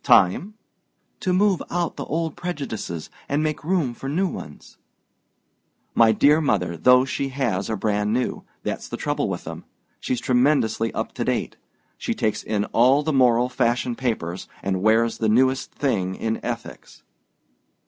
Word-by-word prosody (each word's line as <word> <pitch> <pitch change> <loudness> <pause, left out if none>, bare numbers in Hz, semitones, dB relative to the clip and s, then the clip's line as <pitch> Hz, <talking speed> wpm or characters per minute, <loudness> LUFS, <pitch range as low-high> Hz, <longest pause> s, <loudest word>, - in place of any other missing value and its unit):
"Time?" 180 - +4 0.6
"To 185 - -1
move 190 0 +3
out 175 -1 -1
the - - -5
old 160 0 -2
prejudices 135 - -5 0.2
and 145 +2 +1
make 155 -1 -2
room 160 -7 0
for 135 +3 -6
new 185 +7 +1
ones." 75 - -9 1.1
"My 115 -1 +5
dear 145 +8 +4
mother, 90 - 0
those 125 +9 +5
she 135 +1 -2
has 120 -8 -1
are 110 - 0
brand 105 +1 0
new; 125 +2 -1 0.2
that's - - -4
the - - -4
trouble - - -1
with - - -4
them. - - -7 0.4
She's 125 - -2
tremendously 125 -3 +2
up - - -3
to - - -2
date. - - -1 0.4
She - - -2
takes 110 0 -1
in 105 -1 -1
all 130 +5 +5
the 155 0 0
moral 125 -2 +4
fashion 125 -1 0
papers, 105 -9 -3 0.2
and 95 -1 -1
wears 110 +2 +3
the 110 - +1
newest 130 +4 +2
thing 95 -10 -1
in 110 0 -3
ethics." - - -7
125 Hz, 160 wpm, -23 LUFS, 110-145 Hz, 1.1 s, My